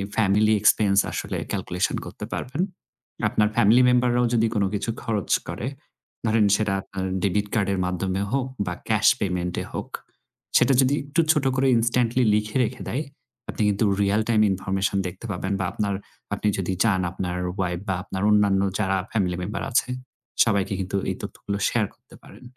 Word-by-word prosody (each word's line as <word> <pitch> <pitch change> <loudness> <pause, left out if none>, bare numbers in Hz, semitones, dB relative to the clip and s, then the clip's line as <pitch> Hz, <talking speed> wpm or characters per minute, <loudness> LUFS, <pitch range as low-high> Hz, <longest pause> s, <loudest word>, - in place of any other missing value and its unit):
Family 105 0 +3
expense 105 -2 +4
আসলে - - -3
calculation - - -1
করতে - - -7
পারবেন। 140 +7 -3 0.7
আপনার 105 - +2
ফ্যামিলি 115 +5 +5
মেম্বাররাও 125 0 +3
যদি 115 -1 +3
কোন 100 - +2
কিছু 105 +3 -2
খরচ 105 -5 -2 0.2
করে, - - -4 0.6
ধরেন 110 -1 +3
সেটা 105 -2 0
আপনার 95 0 -6 0.2
ডেবিট 105 +1 +1
কার্ডের 100 -3 +1
মাধ্যমে 95 +1 -1
হোক 135 -1 0 0.2
বা 90 - -2 0.2
ক্যাশ 110 -1 +3
পেমেন্ট 90 -3 -2
এ - - -8
হোক - - -5 0.7
সেটা 135 - +4
যদি 130 +2 +3
একটু 155 +4 +2
ছোট 150 -4 +1
করে 135 0 +2
instantly 120 +2 +2
লিখে 105 +2 -1
রেখে 125 +2 -4
দেয়, 140 +6 -1 0.5
আপনি - - -4
কিন্তু 105 +2 +1 0.2
রিয়াল 100 +2 +2
টাইম 110 -2 +4
ইনফরমেশন 95 +1 -1
দেখতে 90 +5 -9
পাবেন 95 +1 -2
বা 95 - 0
আপনার 100 -2 -1 0.4
আপনি - - -1
যদি 95 -1 -1
চান 105 -5 +2
আপনার 90 -1 -3 0.2
ওয়াইফ 90 -3 -1
বা 95 - 0
আপনার 95 -1 -5
অন্যান্য 100 -2 +4 0.2
যারা 95 -2 +1
ফ্যামিলি 95 -5 0
মেম্বার 100 +1 -4
আছে 125 - +2 0.5
সবাইকে 100 -3 0
কিন্তু 95 +1 -2
এই - - -2
তথ্যগুলো 100 0 -5
শেয়ার 115 -3 +1
করতে - - -19
পারেন। - - -15
105 Hz, 165 wpm, -24 LUFS, 95-115 Hz, 0.7 s, ফ্যামিলি